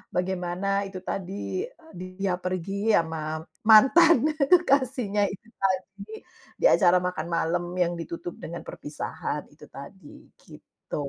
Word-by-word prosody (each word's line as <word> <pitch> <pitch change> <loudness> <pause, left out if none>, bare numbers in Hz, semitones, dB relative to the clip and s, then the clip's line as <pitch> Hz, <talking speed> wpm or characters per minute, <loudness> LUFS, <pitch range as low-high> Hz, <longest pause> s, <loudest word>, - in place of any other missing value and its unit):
bagaimana 190 +2 -1
itu 185 -1 -9
tadi, 200 - -4 0.3
dia 185 +1 -4
pergi 195 +4 -1
sama 160 -1 -2 0.2
mantan 280 +6 +7 0.2
kekasihnya 260 - +3
itu 205 +4 -9
tadi, 195 +3 -3 0.3
di - - -2
acara 180 - +5
makan 180 -3 -3
malam 170 +1 0
yang 175 -1 +1
ditutup 170 +1 -6
dengan 170 +2 -7
perpisahan 145 0 -5
itu - - -15
tadi, - - -13 0.2
gitu. - - -11
190 Hz, 115 wpm, -26 LUFS, 175-210 Hz, 0.3 s, mantan